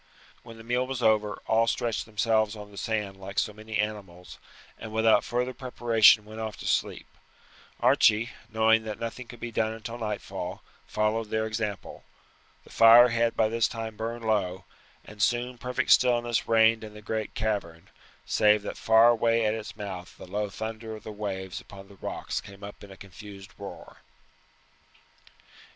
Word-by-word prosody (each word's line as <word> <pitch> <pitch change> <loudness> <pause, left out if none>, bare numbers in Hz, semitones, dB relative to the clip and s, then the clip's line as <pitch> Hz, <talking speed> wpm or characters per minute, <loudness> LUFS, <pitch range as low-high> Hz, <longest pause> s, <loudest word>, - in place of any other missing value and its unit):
When 115 -1 -12
the 115 - -12
meal 125 +2 0
was 130 -2 -4
over 105 -1 +2
all 115 +1 +2
stretched 115 -1 -1
themselves 110 0 +1
on 105 -1 -10
the - - -14
sand 105 -3 -2
like 95 +1 -9
so 105 - +1
many 110 +1 -5
animals, 100 -4 -5 0.4
and 110 - -8
without 110 0 +4
further 125 +1 -2
preparation 115 -4 +4
went 110 +1 -10
off 110 -1 -5
to - - -9
sleep. - - -1 0.7
Archie, 110 +2 +4 0.2
knowing 110 0 +3
that 110 -1 -6
nothing 115 +2 -6
could 120 - -12
be 120 0 -5
done 110 -1 0
until 115 +2 -7
nightfall, 105 -2 -5 0.2
followed 110 +1 -1
their 110 0 0
example. 110 -2 -4 0.6
The - - -18
fire 115 +2 +8
had 115 0 +1
by 110 - +3
this 115 0 +1
time 110 -1 -6
burned 115 +2 -5
low, 95 -4 0 0.4
and 105 0 -10
soon 120 +4 0
perfect 125 0 -1
stillness 120 -2 +3
reigned 115 0 +4
in 105 -1 -9
the 105 - -11
great 110 0 -4
cavern, 100 -7 -3 0.4
save 105 -1 +3
that - - -6
far 110 +1 +6
away 115 -1 +2
at 105 - +2
its 110 -1 -7
mouth 95 -4 -7
the - - -10
low 105 +3 -3
thunder 110 +2 -6
of 110 - -12
the 110 - -7
waves 100 -2 -5
upon 95 -1 -13
the 100 - -15
rocks - - -4
came 100 0 -13
up 100 0 -10
in 100 - -11
a 95 - -12
confused 100 +1 -12
roar. - - -10
110 Hz, 170 wpm, -27 LUFS, 105-115 Hz, 0.7 s, fire